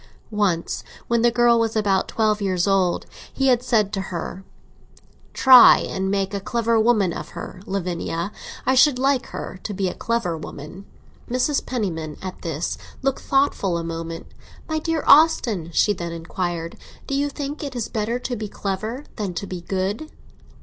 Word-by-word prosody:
Once, 195 -6 0 0.2
when 235 -1 +2
the 240 - +5
girl 240 0 +4
was 225 -1 0
about 200 -3 +2
twelve 215 -1 +1
years 185 -2 0
old, 190 -3 +2 0.3
he 270 0 +1
had 245 -2 +4
said 215 -5 +1
to 195 - -1
her: 180 +2 -5 0.9
"Try 255 -2 +8
and 190 0 -2
make 195 0 -1
a 200 - -1
clever 230 +2 +1
woman 215 -6 +3
of - - -6
her, 185 - -7
Lavinia; 180 -1 -3 0.3
I 260 - +3
should 260 +1 +5
like 270 0 +1
her 185 - -7
to 210 - -5
be 190 0 0
a - - -5
clever 230 -8 -1
woman." 160 +4 -9 0.4
Mrs. 255 +4 +1
Penniman, 165 - -3
at 185 -1 -7
this, 165 -1 -3 0.2
looked 270 0 0
thoughtful 270 -10 +1
a 170 - -3
moment. 165 0 -5 0.4
"My 315 -1 -1
dear 325 0 -1
Austin," 240 - +5
she 205 +5 +3
then 170 -3 -5
inquired, 170 0 -4 0.3
"do - - -4
you 285 +1 +1
think 285 +1 -5
it 275 -3 -5
is 235 -3 -2
better 225 +2 -2
to 250 0 -4
be 215 -2 -4
clever 215 +7 -4
than 200 -5 -3
to 200 - -3
be 185 -2 -6
good?" 195 - -2
205 Hz, 170 wpm, -22 LUFS, 180-245 Hz, 0.9 s, Try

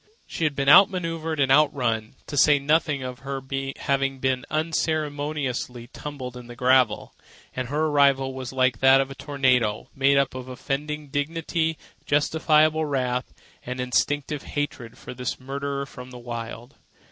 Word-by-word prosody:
She 165 - -3
had 150 -2 0
been 140 0 -1
out 185 +8 +9
manoeuvred 165 -4 -3
and 135 -1 +3
out 150 +1 +6
run, 115 -6 -2
to - - -6
say 145 +1 +6
nothing 150 -1 +1
of 125 0 -6
her 135 0 -4 0.4
having 135 -1 0
been 130 -1 -1
unceremoniously 150 -6 -2
tumbled 130 -4 -7
in 125 -1 -10
the 120 - -10
gravel, 125 -3 +2 0.4
and 130 -1 -3
her 150 +4 0
arrival 140 -3 +3
was 130 -2 -6
like 130 -3 +1
that 135 0 +6
of 135 0 -1
a - - -4
tornado—made 135 -1 +1
up 140 -1 +2
of 130 0 -7
offended 145 +3 -4
dignity, 160 +2 -1 0.3
justifiable 155 +1 +3
wrath, 125 -3 -1 0.3
and 125 +1 -5
instinctive 140 +3 0
hatred 130 -5 -5
for - - -9
this 125 0 -4
marauder 140 +1 -4
from 125 -2 -11
the 125 - -10
Wild. 120 +1 -7
135 Hz, 155 wpm, -25 LUFS, 125-150 Hz, 0.4 s, out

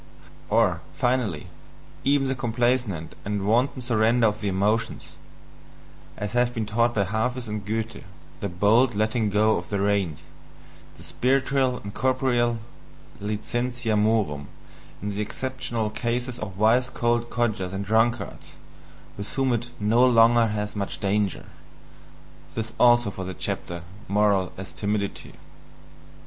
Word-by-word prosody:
or, 105 -6 +3
finally, 120 - 0 0.6
even 140 0 +3
the 130 - +1
complaisant 120 -8 0
and 100 -1 -2
wanton 125 +4 +1
surrender 115 -1 +3
to 105 - -11
the 105 - -1
emotions, 100 +4 0 1.1
as 105 -1 -3
has 120 0 +2
been 115 -3 -3
taught 115 +3 +1
by 100 - +3
Hafis 115 +5 -2
and 105 -1 -4
Goethe, 110 +2 -3 0.4
the 100 - -3
bold 105 +7 +3
letting 110 +1 +1
go 110 +2 +3
of 85 - -6
the 100 - -1
reins, 100 -6 0 0.8
the - - -13
spiritual 130 0 +1
and 100 0 -7
corporeal 125 -3 +1 0.6
licentia 120 +3 -1
morum 105 -9 +1 0.6
in 105 - -2
the 100 +1 -3
exceptional 120 -1 -2
cases 120 +2 -2
of 100 -4 -6
wise 120 +4 +3
old 120 0 +2
codgers 110 -6 -1
and 100 +1 -4
drunkards, 110 0 0 0.6
with 100 - -5
whom 135 -2 +2
it 120 +1 -2
"no 110 +4 +3
longer 115 -1 +6
has 105 0 -3
much 100 -1 -3
danger." 100 -1 0 1.1
This 110 0 -4
also 120 -3 +5
for 95 - -6
the 95 0 -5
chapter: 85 -1 -4 0.2
"Morals 100 -2 +2
as 95 0 -8
Timidity." 100 -1 -3
110 Hz, 130 wpm, -25 LUFS, 100-120 Hz, 1.1 s, longer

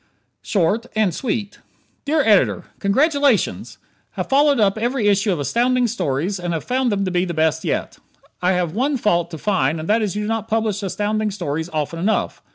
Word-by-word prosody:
Short 205 +4 0
and 215 -5 +2
Sweet 210 -1 -3 0.5
Dear 305 +2 +2
Editor: 210 -5 +3 0.2
Congratulations! 280 +3 +1 0.4
Have - - -4
followed 285 -1 +4
up 200 -2 +3
every 235 0 0
issue 205 +1 +2
of 175 - -1
Astounding 245 - +1
Stories 185 - -1
and 175 -1 -3
have 160 - -3
found 255 -1 0
them 200 -1 0
the 180 -1 0
best 160 0 +1
yet. - - -3 0.4
I 180 +1 +2
have 175 -3 -1
one 270 +6 0
fault 175 -7 +1
to 165 - -7
find 165 -5 0
and 155 - -6
that 220 +2 +2
is 205 -2 -2
you 210 - -2
do - - -3
not 225 -1 -2
publish 220 -2 -1
Astounding 210 +2 -1
Stories 160 -4 -3
often 155 +1 -3
enough. 205 +6 -1
205 Hz, 180 wpm, -20 LUFS, 175-230 Hz, 0.5 s, followed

